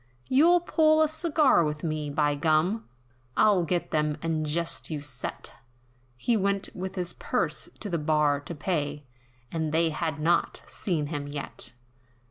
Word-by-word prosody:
"You'll 335 +7 +5
pull 315 -2 +4
a - - +3
cigar 310 - +3
with 150 -1 -3
me, 155 -2 -2
by 145 0 +1
gum! 160 - +1 0.5
I'll 205 -4 +5
get 175 +1 -1
them 150 -1 +1
'and 160 -2 -1
jest 165 +2 -1
you 155 -2 -3
set,'" 130 -4 -5 0.7
He 235 - +1
went 200 -1 0
with 190 +1 -5
his 180 -2 -3
purse, - - -2
to - - -4
the 170 -4 -1
bar 150 -1 +2
to 155 +4 -7
pay, 145 -3 -2 0.5
And 160 -2 -2
they 165 +1 +2
have 155 -1 -2
not 170 +3 +1
seen 165 -6 -2
him 145 -1 -4
yet! 140 -4 -4
160 Hz, 155 wpm, -27 LUFS, 150-190 Hz, 0.7 s, You'll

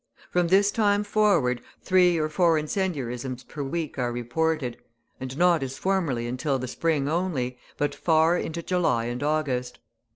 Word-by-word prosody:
From 180 -1 +2
this 200 +3 +4
time 205 -2 +2
forward, 200 - +2 0.2
three 180 -2 +4
or 155 -1 +1
four 165 +1 +3
incendiarisms 135 -7 -3
per 150 - -8
week 150 +1 -3
are 120 -1 0
reported, 125 +1 -1 0.4
and 130 +1 -6
not 175 -2 +4
as 135 0 -4
formerly 165 -10 0
until 130 +3 -1
the 130 0 -4
spring 145 +1 0
only, 150 -7 -1 0.2
but 145 - 0
far 160 +1 +3
into 170 -1 -3
July 170 -11 +1
and 120 +1 -4
August. 145 -5 -1
155 Hz, 155 wpm, -26 LUFS, 125-175 Hz, 0.4 s, this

